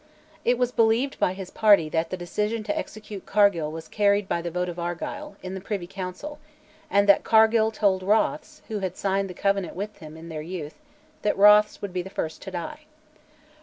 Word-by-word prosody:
It 245 +1 +2
was 250 0 +1
believed 230 +4 +2
by 180 - +2
his 190 -1 -8
party 205 -7 +5
that 165 +1 -1
the 185 - -4
decision 210 +5 -2
to 205 -1 -2
execute 210 -3 -7
Cargill 200 -7 +3
was 160 0 -8
carried 205 -1 +2
by 170 - -1
the 170 - -4
vote 180 +1 -2
of 175 0 -6
Argyll, 175 - -5
in 185 0 -5
the 190 - -5
Privy 195 -2 -4
Council, 195 +11 -7 0.5
and 200 -6 +3
that 200 - +6
Cargill 220 0 +4
told 200 -4 +1
Rothes 280 +10 0
(who 215 -2 -3
had 185 -2 -4
signed 195 0 0
the 180 - -8
Covenant 195 -2 0
with 205 +3 -6
him 155 -2 -10
in 165 +1 -10
their 155 -1 -5
youth) 155 -2 -7 0.4
that 210 - 0
Rothes 210 +1 +6
would 200 -3 -4
be 180 - -1
the 185 - -8
first 160 -4 -4
to - - -7
die. 185 - -6
195 Hz, 205 wpm, -25 LUFS, 175-215 Hz, 0.5 s, that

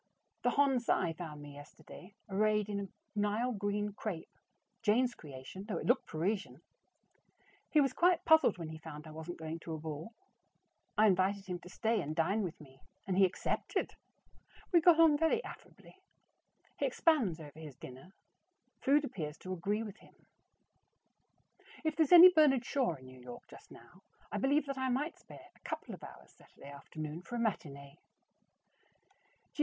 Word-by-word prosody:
The 245 - +2
Hon. 275 -1 +3
Cy 175 -7 +1
found 155 -3 -8
me 145 -1 -10
yesterday 150 +6 -13
arrayed 210 +1 +1
in 200 -1 -2
a 200 - -4 0.3
Nile 210 +4 0
green 205 -1 -2
crepe 195 -5 -6 0.5
(Jane's 240 +3 +2
creation, 140 - -10
though 200 -6 -2
it - - -5
looked 250 +2 +2
Parisian). 160 - -2 1.1
He 305 - +5
was 275 -2 +1
quite 350 +2 +3
puzzled 320 - +5
when 165 -3 -6
he 160 0 -8
found 150 -1 -9
I 155 - -10
wasn't 160 +3 -7
going 160 +1 -5
to 165 0 -7
a - - -5
ball. 155 +5 -6 0.9
I 215 - +6
invited 195 0 +2
him 180 -2 -4
to 180 - -13
stay 220 +2 0
and 155 -1 -4
dine 190 +7 +1
with 180 -5 -4
me, 135 -2 -16 0.2
and 190 - -1
he 195 +1 +6
accepted! 185 - -2 0.8
We 345 -3 +6
got 335 -1 +6
on 310 -3 +6
very 325 +9 +2
affably. - - -12 0.8
He - - +2
expands 245 - +2
over 150 0 -11
his 150 -4 -9
dinner. 130 +6 -11 0.7
Food 290 +2 +3
appears 160 - -5
to 185 - -6
agree 205 +5 -1
with 210 -3 -8
him. - - -20 1.7
If 315 -1 0
there's 320 -4 +2
any 355 +1 +11
Bernard 275 -6 +4
Shaw 260 - 0
in 130 -2 -15
New 130 0 -13
York 125 -1 -10
just - - -15
now, - - -16 0.3
I - - -2
believe 285 +2 +2
that 275 -1 -4
I 260 0 0
might 285 +6 -2
spare - - -14
a - - -24
couple - - -5
of - - -11
hours - - -12
Saturday 140 - -15
afternoon 155 +3 -7
for 240 - -8
a - - -2
matinee. 140 -11 -3
200 Hz, 170 wpm, -33 LUFS, 160-255 Hz, 1.7 s, any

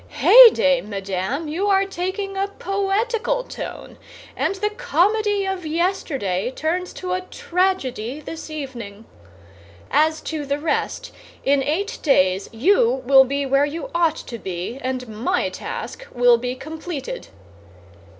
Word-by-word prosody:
Heyday, 425 - +7
madame! 200 - -3
you 345 +7 -1
are 390 -1 +3
taking 390 +1 -4
a 390 +1 0
poetical 435 +5 0
tone, - - -8 0.4
and - - 0
the 420 +2 -1
comedy 420 -2 +1
of 385 -2 -3
yesterday 300 - -1
turns 335 +7 -2
to 365 -1 -4
a 370 - -1
tragedy 340 - -2
this 320 +1 -8
evening. 240 -8 -7 0.9
As 315 +1 +3
to 310 -2 -4
the 280 0 -1
rest, 300 +1 -2 0.3
in 280 0 +3
eight 330 - -2
days 190 - +2
you 255 - +2
will 265 +1 +7
be 280 +2 -2
where 275 +1 +3
you 320 +3 -6
ought 335 -2 +2
to 235 -6 -8
be, 190 +6 -5
and 255 -1 -3
my 225 - -1
task - - -7
will 245 -1 +4
be 250 +1 -3
completed." 320 - -6
310 Hz, 130 wpm, -22 LUFS, 255-385 Hz, 0.9 s, Heyday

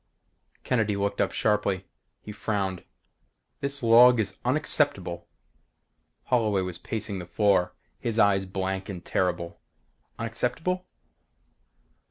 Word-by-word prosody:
Kennedy 110 -5 +1
looked 100 0 -1
up - - +1
sharply. 100 -3 0 0.4
He 105 - -7
frowned. 100 -3 -2 0.8
"This 140 -1 -3
log 120 +1 +7
is 100 -3 -2
unacceptable." 120 - 0 1.0
Holloway 110 -6 +1
was 90 -2 -5
pacing 105 -3 -4
the 90 - -8
floor, 90 0 +2 0.2
his 115 -2 -2
eyes 100 -3 +3
blank 95 +1 -3
and 90 -3 -7
terrible 90 -2 -1 0.6
"Unacceptable?" 125 +11 -2
100 Hz, 105 wpm, -27 LUFS, 95-115 Hz, 1.0 s, log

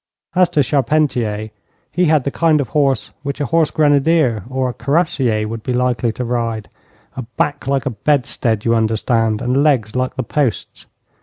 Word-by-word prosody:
As 180 -1 +3
to 150 -5 +2
Charpentier, 125 -6 0 0.4
he 180 +4 +1
had 155 -4 +3
the 140 - -2
kind 160 -1 +2
of 135 -6 -2
horse 135 -6 0
which 140 0 -5
a 145 - 0
horse 160 +3 +2
grenadier 145 - +2
or 130 0 -1
a 125 - -3
cuirassier 135 -9 0
would 115 +1 -5
be 125 +3 -3
likely 125 -1 0
to 125 - -4
ride: 115 -3 -2 0.5
a 130 - -4 0.2
back 145 - -1
like 135 0 0
a 135 - -1
bedstead, 120 -4 0
you 115 - +3
understand, 115 0 0
and 125 +3 +1
legs 130 -8 +1
like 130 0 -1
the 130 - -2
posts. 125 -5 -2
130 Hz, 175 wpm, -18 LUFS, 115-150 Hz, 0.5 s, As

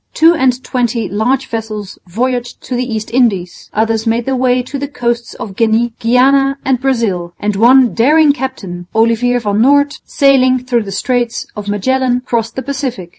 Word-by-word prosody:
Two 330 +2 +5
and 260 -5 0
twenty 240 -3 -1
large 245 +6 0
vessels 215 -3 -6
voyaged 245 +5 -2
to 255 - -4
the 250 0 -2
East 220 0 -4
Indies; 200 -8 0
others 225 +1 -1
made 230 +1 0
their 270 - -1
way 250 0 +1
to 275 +3 -6
the 285 - -3
coasts 235 -4 -3
of 195 -3 -8
Guinea, 230 +2 +1
Guiana 270 +4 +3
and 260 -2 +1
Brazil; 210 -10 -1
and 210 0 -1
one 245 +4 +5
daring 295 +5 +4
captain, 195 - -6
Olivier 230 +2 +2
van 210 -3 -1
Noort, 285 +3 +3
sailing 265 -2 +3
through 240 -3 0
the 195 - -6
Straits 240 +3 -1
of 210 -1 -7
Magellan, 250 +4 0
crossed 230 -1 -2
the 260 - -4
Pacific. 260 -9 -4
245 Hz, 175 wpm, -14 LUFS, 220-260 Hz, -, Two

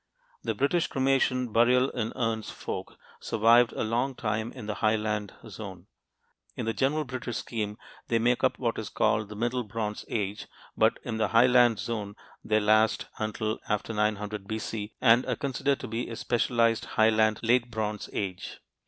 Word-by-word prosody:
The - - -2
British 155 +5 +1
cremation 130 -3 +1
burial 125 +3 +4
in 115 -2 -2
urns 115 -2 -1
folk - - -6 0.2
survived 115 +2 +4
a - - -2
long 120 +4 0
time 110 0 -2
in 125 -5 -9
the 105 - -2
highland 105 -2 0
zone. 95 -4 -9 0.7
In - - -4
the 115 - 0
general 145 +5 +1
British 125 -2 -4
scheme, 105 -3 -4 0.3
they 115 - +2
make 120 +2 +1
up - - +2
what - - -1
is - - -5
called 105 -1 +1
the 105 - -8
"Middle 120 +3 -1
Bronze 105 -1 -4
Age," 105 -2 -3 0.3
but - - +3
in 115 -2 -3
the 110 -1 +1
highland 120 0 +5
zone 105 -3 -4 0.3
they 110 0 +2
last 110 +1 +3
until 110 0 -2
after 105 +1 -1
900 105 -1 -1
B.C. 110 -1 -4
and 120 0 +5
are - - 0
considered 140 0 -1
to - - -5
be 115 +2 -3
a 115 - -5
specialized 115 -1 +1
highland 110 0 +4
"Late 120 +1 +3
Bronze 110 -2 -3
Age." 95 -3 -4
110 Hz, 165 wpm, -28 LUFS, 105-120 Hz, 0.7 s, highland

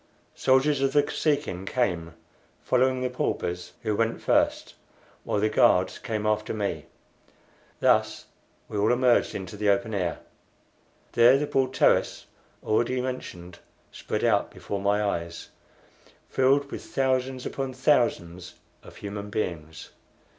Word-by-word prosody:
Soldiers 135 +2 +2
of 135 0 +1
the 145 -1 +5
Kosekin 145 - -1
came, 85 -10 -1 0.5
following 130 0 +2
the 125 - 0
paupers, 90 -7 -3
who 105 - 0
went 115 +1 0
first, - - +1 0.5
while - - -1
the 105 - +2
guards 95 -3 +3
came 110 -3 -3
after 105 0 0
me. 100 -8 -3 0.9
Thus - - +2 0.4
we 105 - -4
all 105 +3 +3
emerged 125 0 +2
into 95 +1 -6
the 105 0 0
open 110 +2 +1
air. 90 -5 -1 0.9
There 120 +3 +6
the 150 - -1
broad 130 -2 0
terrace - - +2 0.4
already 120 +4 +1
mentioned 90 -9 -6 0.3
spread - - -4
out - - +2
before 100 -1 -6
my 100 +1 +1
eyes, 85 -4 -3 0.8
filled 140 +2 +2
with - - -6
thousands 130 -1 -1
upon 135 -1 -3
thousands 115 - 0 0.3
of - - -14
human 100 0 -6
beings. 80 -6 -5
110 Hz, 130 wpm, -26 LUFS, 95-130 Hz, 0.9 s, There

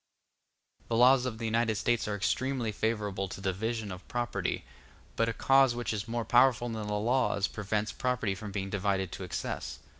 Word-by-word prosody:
The 115 - -1
laws 125 +2 +6
of 115 -3 -4
the 115 - -4
United 115 0 +1
States 115 +2 0
are 105 - -1
extremely 120 +4 0
favorable 105 -3 -1
to 95 - -8
the 95 -1 -1
division 110 +1 -3
of 90 0 -9
property; 120 -1 -2 0.5
but 115 0 +2
a - - +1
cause 135 +1 +4
which 120 -1 -2
is 105 +1 -3
more 115 0 -2
powerful 120 0 +4
than 110 -2 -4
the 105 - -2
laws 110 -2 +1
prevents 105 +1 -2
property 125 -6 -1
from 100 +2 -7
being 95 -1 -3
divided 95 -2 0
to 95 - -6
excess. 90 - -4
110 Hz, 185 wpm, -30 LUFS, 100-120 Hz, 0.5 s, laws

